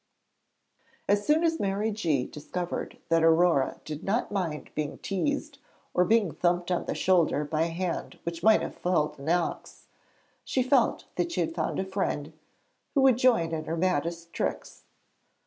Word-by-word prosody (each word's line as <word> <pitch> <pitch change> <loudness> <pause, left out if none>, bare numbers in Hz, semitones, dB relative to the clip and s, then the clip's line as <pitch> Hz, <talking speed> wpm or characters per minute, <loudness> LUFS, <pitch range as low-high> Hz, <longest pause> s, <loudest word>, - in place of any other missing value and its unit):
As 205 0 +2
soon 310 +2 +4
as 325 -1 +1
Mary 200 +3 0
G. 160 -11 0
discovered 175 +4 -5
that 165 0 +4
Aurore 165 -4 +3
did 155 +1 -6
not 220 +5 0
mind 175 -7 -3
being 150 -1 -3
teased 285 - -2 0.3
or 180 - +3
being 215 -5 +3
thumped 175 +1 0
on 180 - 0
the - - -3
shoulder 170 -5 +2
by 155 +2 0
a - - -1
hand 170 +1 -3
which 170 0 -4
might 220 0 +5
have - - -4
felled 155 -5 0
an 140 +3 -4
ox, 175 0 -2 0.6
she 260 - 0
felt 255 -2 +2
that 340 - 0
she - - 0
had 325 - -1
found - - -2
a 190 - -1
friend 190 -6 -2 0.6
who 275 - +4
would 260 -3 +5
join 230 -11 +3
in 155 -1 -3
her 165 +1 -3
maddest 170 -1 -1
tricks. - - -4
180 Hz, 165 wpm, -28 LUFS, 165-220 Hz, 0.6 s, might